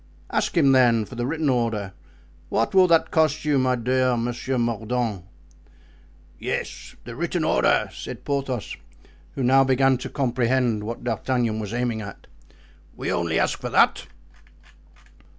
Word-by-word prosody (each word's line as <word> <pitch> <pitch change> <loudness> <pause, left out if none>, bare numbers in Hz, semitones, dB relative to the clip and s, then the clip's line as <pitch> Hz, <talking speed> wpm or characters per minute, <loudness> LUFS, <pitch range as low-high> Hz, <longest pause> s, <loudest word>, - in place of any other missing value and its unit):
Ask - - -1
him 140 -5 +5
then, 120 -4 +4
for 130 - -13
the 120 0 -3
written 155 +1 -1
order. 115 -7 -1 0.6
What 115 - 0
will 190 -1 +6
that 165 -2 +3
cost 155 -2 +1
you 145 -2 +2
my 130 -1 +2
dear 125 +1 +1
Monsieur 120 +2 -2
Mordaunt?" 115 -4 -2 1.1
"Yes, - - -5
the 120 0 -9
written 170 +3 -2
order," - - +2
said - - -8
Porthos, 135 -5 -3 0.6
who 135 - -2
now 135 +2 +5
began 135 -1 +2
to - - -6
comprehend 120 -4 0
what 115 +2 -6
D'Artagnan 120 -4 -1
was 105 -2 -5
aiming 120 -2 -2
at, 100 -1 -10 0.7
"we - - -3
ask - - 0
only 85 -2 -1
for - - -4
that." - - +3
125 Hz, 145 wpm, -24 LUFS, 115-135 Hz, 1.1 s, will